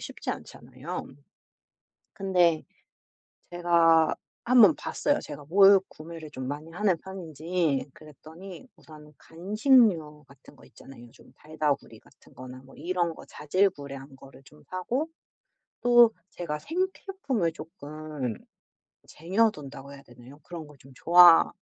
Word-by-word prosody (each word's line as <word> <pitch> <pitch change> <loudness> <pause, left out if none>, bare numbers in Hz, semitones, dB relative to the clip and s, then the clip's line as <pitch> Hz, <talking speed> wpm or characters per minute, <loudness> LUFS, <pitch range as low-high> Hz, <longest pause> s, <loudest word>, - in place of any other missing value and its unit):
쉽지 - - -10
않잖아요. - - -8 1.1
근데 180 -5 +1 0.9
제가 170 -2 +3 0.3
한번 235 -8 +6
봤어요, 290 0 -1
제가 145 -1 -9
뭘 195 +4 +6
구매를 160 -1 -11
좀 130 -2 -6
많이 150 +3 -6
하는 185 0 0
편인지. 165 -5 -3
그랬더니 160 - -13
우선 150 -1 -16
간식류 185 - +1
같은 140 -2 -19
거 - - -18
있잖아요. 120 -3 -15
좀 - - -20
달달구리 155 -2 -3
같은 - - -23
거나 130 0 -11
뭐 135 - -17
이런 170 +1 -2
거 - - -13
자질구레한 145 -5 -2
거를 135 0 -16
좀 150 +3 -19
사고 245 - -3 0.7
또 240 -2 +6 0.2
제가 150 -4 -5
생필품을 325 - -3
쪼끔 155 - -7 0.7
쟁여 200 +8 +1
둔다고 140 -2 -11
해야 140 - -13
되나요? 125 +3 -16
그런 165 0 -9
걸 145 -1 -17
좀 135 - -17
좋아 175 +1 +7
165 Hz, 260 characters per minute, -27 LUFS, 145-190 Hz, 1.1 s, 좋아